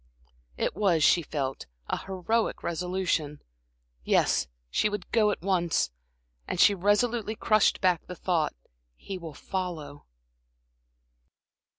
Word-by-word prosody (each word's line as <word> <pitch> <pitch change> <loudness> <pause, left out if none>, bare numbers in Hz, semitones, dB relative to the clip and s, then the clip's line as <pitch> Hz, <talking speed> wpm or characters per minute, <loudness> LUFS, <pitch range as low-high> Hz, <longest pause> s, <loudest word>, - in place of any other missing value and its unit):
It - - -1
was, 175 -7 +2
she 170 - +5
felt, 140 -4 -4 0.2
an - - -1
heroic 195 +4 -1
resolution. 170 -4 -1 0.6
Yes, 60 0 +2 0.2
she 210 - +2
would 205 -3 -6
go 215 -2 +4
at 200 - -3
once. 175 - +1 0.6
And - - -3
she 205 - +7
resolutely 210 +3 +1
crushed 215 -1 +3
back 180 -3 +2
the 180 - -7
thought: 170 -4 0 0.4
"He 190 - -7
will 165 -4 -8
follow." 160 -6 -5
180 Hz, 115 wpm, -28 LUFS, 160-205 Hz, 0.6 s, she